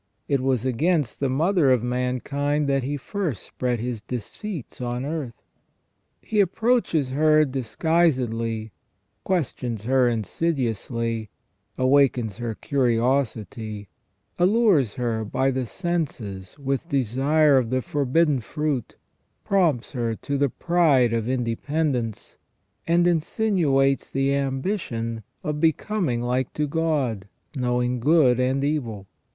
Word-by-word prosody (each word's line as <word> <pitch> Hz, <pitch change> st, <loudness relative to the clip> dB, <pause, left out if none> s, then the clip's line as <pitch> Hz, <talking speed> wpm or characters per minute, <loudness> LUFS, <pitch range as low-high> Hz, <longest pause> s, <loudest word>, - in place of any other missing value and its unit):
It 140 Hz, -, +2 dB
was 130 Hz, -2 st, 0 dB
against 150 Hz, +2 st, 0 dB
the 140 Hz, -, 0 dB
mother 160 Hz, +3 st, +2 dB
of 125 Hz, -3 st, +3 dB
mankind 135 Hz, +4 st, -1 dB
that 135 Hz, -1 st, +2 dB
he 140 Hz, +3 st, -2 dB
first 165 Hz, -, -3 dB
spread 125 Hz, -2 st, -2 dB
his 120 Hz, -1 st, -3 dB
deceits 130 Hz, -, -6 dB
on 125 Hz, +1 st, -3 dB
earth. 145 Hz, -6 st, -5 dB, 0.8 s
He 215 Hz, -, -1 dB
approaches 200 Hz, -, +2 dB
her 155 Hz, +2 st, +4 dB
disguisedly, 125 Hz, -5 st, 0 dB, 0.5 s
questions 125 Hz, -, -2 dB
her 130 Hz, +1 st, +3 dB
insidiously, 115 Hz, -, -2 dB, 0.5 s
awakens 130 Hz, -5 st, +2 dB
her 120 Hz, -2 st, -4 dB
curiosity, 115 Hz, -5 st, -1 dB, 0.5 s
allures 180 Hz, -, +3 dB
her 115 Hz, -3 st, -1 dB
by 130 Hz, +5 st, 0 dB
the 130 Hz, -2 st, -2 dB
senses 130 Hz, -, -4 dB
with 140 Hz, +3 st, -2 dB
desire 140 Hz, +2 st, +3 dB
of 120 Hz, -3 st, -2 dB
the 130 Hz, 0 st, 0 dB
forbidden 145 Hz, +2 st, +1 dB
fruit, 150 Hz, -1 st, -3 dB, 0.5 s
prompts 170 Hz, -11 st, +1 dB
her 115 Hz, -4 st, -2 dB
to 140 Hz, +5 st, -4 dB
the 140 Hz, -1 st, +3 dB
pride 145 Hz, -8 st, +3 dB
of 115 Hz, 0 st, -1 dB
independence, 125 Hz, 0 st, -2 dB, 0.5 s
and 170 Hz, +1 st, +3 dB
insinuates 160 Hz, -6 st, +1 dB
the 135 Hz, +1 st, +1 dB
ambition 135 Hz, -, -2 dB, 0.2 s
of 150 Hz, 0 st, -2 dB
becoming 160 Hz, -, 0 dB
like 125 Hz, +1 st, -1 dB
to 150 Hz, -, 0 dB
God, 145 Hz, -10 st, -1 dB, 0.3 s
knowing 125 Hz, -1 st, 0 dB
good 135 Hz, -2 st, +4 dB
and 130 Hz, +2 st, +1 dB
evil. 120 Hz, -9 st, -2 dB
135 Hz, 115 wpm, -24 LUFS, 120-155 Hz, 0.8 s, her